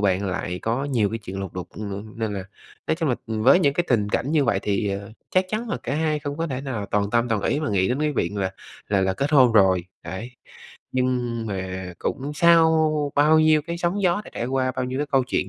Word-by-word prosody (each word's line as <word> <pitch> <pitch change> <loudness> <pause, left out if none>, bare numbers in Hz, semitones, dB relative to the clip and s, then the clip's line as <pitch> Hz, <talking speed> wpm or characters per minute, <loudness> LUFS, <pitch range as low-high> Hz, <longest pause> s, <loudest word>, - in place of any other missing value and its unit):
bạn 100 -1 +1
lại 90 -1 -3
có 120 +5 -1
nhiều 120 -8 +1
cái 115 - -3
chuyện 95 -3 -7
lục 95 -3 -5
đục, 90 -1 -5
ừm, 105 +1 -7
nên 110 -2 -2
là 95 -2 -4 0.4
nói - - +2
chung 165 -3 -1
là 125 - +2
với 115 +10 +4
những 140 -4 +2
cái 175 - +1
tình 105 -5 +2
cảnh 135 +7 -1
như 150 -3 +3
vậy 115 -5 +2
thì, 100 0 0
ờ, 100 +2 -5 0.2
chắc 185 0 +3
chắn 220 +4 -3
là - - -1
cả 130 - -2
hai 155 0 0
không 145 -1 -5
có 165 +1 -1
thể 130 -3 -3
nào 120 -7 -4
toàn 100 0 0
tâm, 120 +1 +2
toàn 105 -3 0
ý 150 - 0
mà 155 - -2
nghĩ 95 -2 +2
đến 130 +4 -1
cái 150 0 +1
viện 100 -6 -1
là 95 -1 -1 0.4
là 100 -1 +2
là 95 0 +1
kết 140 +7 -1
hôn 130 -6 +6
rồi, 95 -4 +4 0.2
đấy. 95 +7 -6 0.6
Nhưng 125 -3 -1
mà 95 -2 -4
cũng 140 +1 -3
sau 160 -2 +4
bao 150 +2 +5
nhiêu 155 -1 +4
cái 170 +2 -5
sóng 175 +4 -1
gió 185 +2 +2
đã - - -11
trải 120 - -2
qua, 130 0 0
bao 130 - 0
nhiêu 130 +1 -3
cái 145 - -1
câu 135 -2 +2
chuyện 130 - -1
125 Hz, 250 wpm, -24 LUFS, 100-150 Hz, 0.6 s, hôn